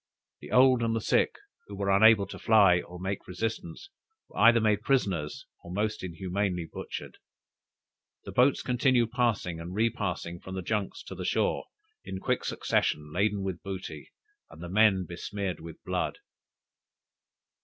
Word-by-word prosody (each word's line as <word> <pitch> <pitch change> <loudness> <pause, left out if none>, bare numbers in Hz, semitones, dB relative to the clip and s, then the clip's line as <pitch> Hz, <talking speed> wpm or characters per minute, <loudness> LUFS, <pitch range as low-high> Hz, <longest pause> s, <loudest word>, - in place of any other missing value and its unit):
The 75 - -11
old 130 -1 +5
and 115 -1 0
the - - +1
sick, - - +2 0.3
who 100 - -8
were 100 0 0
unable 110 0 +6
to 100 - -9
fly, 100 -5 +5
or 90 0 -11
make 95 +1 -4
resistance, 115 - -5 0.4
were - - -8
either 115 +2 +7
made 105 -2 +2
prisoners 95 - 0 0.2
or 85 - -10
most 105 +2 -2
inhumanly 90 0 -2
butchered! - - -7 1.0
The - - -8
boats 130 +3 +3
continued 125 -2 +2
passing 110 -9 0
and 85 +3 -7
repassing 90 -6 -1
from 95 +2 -8
the 95 - -4
junks 105 +1 -2
to - - -9
the - - -6
shore, - - 0 0.4
in 95 - -6
quick - - -1
succession, 75 0 -1
laden 100 +2 +1
with 95 -3 -4
booty, 95 -6 -7 0.4
and - - -14
the 85 - -6
men 95 -1 +4
besmeared 90 +1 -4
with 80 0 -10
blood! - - -2
100 Hz, 155 wpm, -28 LUFS, 90-110 Hz, 1.0 s, either